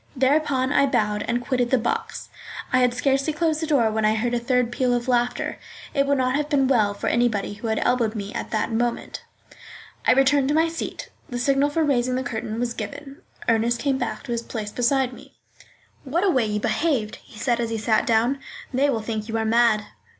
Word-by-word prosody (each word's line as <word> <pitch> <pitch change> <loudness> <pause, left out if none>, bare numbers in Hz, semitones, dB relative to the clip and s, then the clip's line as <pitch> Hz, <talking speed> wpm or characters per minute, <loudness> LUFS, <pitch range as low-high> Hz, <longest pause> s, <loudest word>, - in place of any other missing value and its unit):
Thereupon 270 0 +2
I 280 - +4
bowed 210 -5 0
and 240 +1 -1
quitted 250 -2 0
the 260 - +3
box. 235 0 -3 0.4
I 255 - +5
had 250 -1 +3
scarcely 275 +3 +1
closed 315 0 0
the 320 - -2
door 250 -8 +3
when 220 0 -1
I 215 +1 +3
heard 240 +2 -1
a 240 - +1
third 245 0 +1
peal 245 0 +1
of 240 0 -3
laughter. 245 -1 0 0.3
It 275 0 +1
would 280 0 +2
not 255 0 +1
have 295 +1 -1
been 275 -3 +3
well 215 -6 +2
for - - -6
anybody 230 -4 +1
who 205 +3 -6
had 220 0 0
elbowed 235 -3 +1
me 205 0 -5
at - - -4
that 220 +1 -1
moment. 235 +1 -2 0.9
I - - +7
returned 270 +1 +3
to 295 - +1
my 325 +1 +3
seat. 330 - -6 0.2
The 245 - -4
signal 275 +3 +2
for 320 +2 0
raising 255 -3 +1
the 260 - -1
curtain 225 -2 -4
was 240 -1 -1
given. 280 - -7 0.3
Ernest 230 +1 +2
came 270 +1 0
back - - -3
to 265 - -7
his 235 -1 -1
place 215 -3 -5
beside 255 +2 +1
me. - - -14 0.7
"What 320 +7 -1
a 395 - +4
way 255 -7 +2
you 210 0 -1
behaved!" 245 -4 0
he - - -17
said, 240 +1 0
as 230 -1 -1
he 225 - -2
sat 220 +4 +1
down. 235 +4 +2 0.3
"They 275 +3 +2
will 230 -5 0
think 220 0 -4
you 225 - -1
are 220 - -1
mad." 225 -2 +3
245 Hz, 220 wpm, -23 LUFS, 225-275 Hz, 0.9 s, I